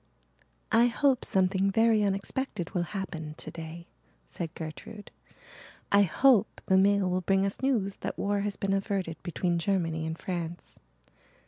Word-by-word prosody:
"I 235 +1 +5
hope 260 +2 +2
something 190 +1 +2
very 225 +1 +3
unexpected 200 0 -2
will 180 - 0 0.2
happen 160 -5 -5
today," 165 +1 -8 0.4
said 160 - -6
Gertrude. 165 +7 -8 0.8
"I 200 - +6
hope 225 +4 +3
the 190 - +3
mail 200 0 +4
will 185 0 0
bring 195 +2 +2
us 200 - -4
news 225 -8 0
that - - -5
war 205 0 0
has 200 0 -2
been 195 0 -1
averted 195 -4 -2
between 175 -1 -1
Germany 165 -3 -1
and 160 0 -4
France." 175 -2 -6
195 Hz, 140 wpm, -29 LUFS, 170-205 Hz, 0.8 s, I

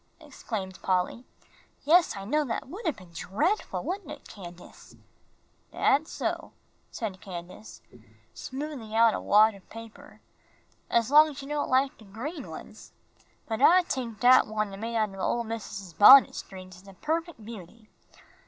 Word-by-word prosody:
exclaimed 190 -5 -7
Polly. 185 +6 -1 0.6
"Yes, 335 -1 +4
I 195 - -7
know, 300 +8 +1
that 235 -1 -4
would 385 - -7
have 315 - 0
been 185 -3 -15
dreadful, 295 - -2
wouldn't 370 -4 -5
it, 300 -1 -10
Candace?" 175 -3 -13 0.8
"Dat's 295 +4 +1
so," - - -4 0.4
said 205 -6 -6
Candace, 180 +2 -10 0.5
smoothing 265 -5 -7
out 225 -1 +5
a - - -3
wad 215 +2 +5
of 195 -2 -17
paper, 225 -1 -12 0.7
"as 235 +2 +1
long 305 +1 +7
as 285 -2 -9
you - - -9
don' 295 -1 -2
like 265 +1 +1
de 220 - -15
green 265 - -7
ones. - - -11 0.5
But 220 +1 -4
I 360 +5 +6
tink 240 - -4
dat 250 +3 +6
one 215 -2 -3
I - - -6
made 230 +3 -5
out 215 -3 0
o' 195 - -10
ole 235 +5 -1
missus's 205 -5 -7
bunnet 260 - +8
strings 185 -2 -10
is 200 - -21
a 195 - -12
perfec' 330 - -3
beauty. 220 -1 -12
225 Hz, 160 wpm, -27 LUFS, 195-285 Hz, 0.8 s, bunnet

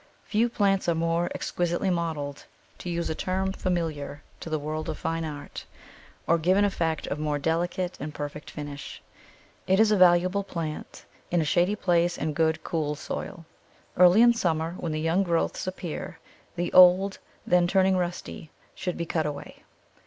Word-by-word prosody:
Few 225 +3 +1
plants 195 -5 +1
are 170 - +2
more 165 +1 0
exquisitely 175 +2 -1
modelled, 155 -5 -3 0.3
to 180 - -6
use 170 0 -2
a - - 0
term 190 +3 -1
familiar 160 -7 -3 0.2
to - - -7
the 155 - 0
world 155 +1 -4
of - - -3
fine 165 0 -2
art, 145 -2 -7 0.6
or 170 0 +3
give 180 +4 +3
an 205 - +4
effect 165 -5 -1
of 145 - -4
more 150 -1 -1
delicate 175 +4 -1
and 150 +2 -5
perfect 145 0 -6
finish. 145 -2 -7 0.7
It 190 +1 +3
is 220 -1 +5
a - - +5
valuable 180 +2 +4
plant 165 -5 -6 0.2
in 175 - +1
a 160 - +1
shady 175 +6 +2
place 175 -3 +1
in 155 +1 -2
good, 160 +1 +1
cool 150 -3 -2
soil. 165 +3 -6 0.5
Early 180 +5 +7
in 240 0 +6
summer, 165 -7 -1
when 165 - -3
the 155 - -2
young 165 +4 +2
growths 170 -1 -1
appear, 180 -3 -5 0.4
the 175 0 -2
old, 185 +2 +6 0.3
then 180 0 +3
turning 190 +1 +3
rusty, 175 -3 -4 0.2
should 180 - -4
be 170 - -2
cut 160 -2 -1
away. 145 -1 -7
170 Hz, 170 wpm, -26 LUFS, 155-185 Hz, 0.7 s, Early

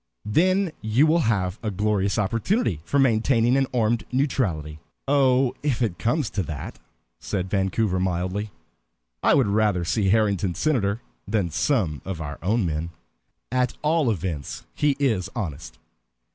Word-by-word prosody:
"Then 185 - +2
you 110 +7 +3
will 160 +2 +3
have 95 -3 0
a 110 - -2
glorious 100 0 0
opportunity 110 - 0
for 85 +12 -1
maintaining 120 -1 +3
an 135 -1 +2
armed 115 -2 +1
neutrality." 95 - -1 0.3
"Oh, 135 -2 +3
if 135 -4 0
it 100 -7 -2
comes 120 0 0
to 105 - -1
that," 80 -5 -6 0.4
said 95 -2 -3
Vancouver 95 0 +1
mildly, 95 +3 -1 0.7
"I - - +4
would 135 -4 +4
rather 100 -3 +1
see 100 +2 +1
Harrington 100 -4 +2
senator 115 -8 0 0.3
than 100 -5 0
some 80 - 0
of 95 -4 -5
our 75 -3 -6
own 105 +3 +1
men. 80 0 -2 0.6
At 125 -1 0
all 155 -3 +2
events, 85 -8 -4
he 145 -2 +1
is 110 -10 +1
honest." 75 - -5
105 Hz, 145 wpm, -24 LUFS, 90-130 Hz, 0.7 s, I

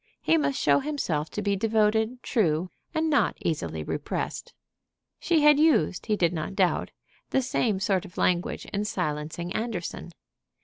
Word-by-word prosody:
He - - +2
must 290 -3 +1
show - - +4
himself 225 - -2
to 210 - -4
be 200 0 +1
devoted, 220 +3 +1
true, 180 - +1 0.2
and 320 -1 0
not 305 - +2
easily - - -2
repressed. - - -4 0.7
She 330 -3 +2
had 295 -1 +6
used, 290 - +2
he 215 - +2
did 175 -4 +1
not 170 +4 -4
doubt, 185 -3 +1 0.4
the 265 - +1
same 225 -5 0
sort 195 -2 +1
of 180 -4 -13
language 180 0 0
in 205 +1 0
silencing 170 -1 -3
Anderson. 215 -7 -4
205 Hz, 150 wpm, -26 LUFS, 175-255 Hz, 0.7 s, had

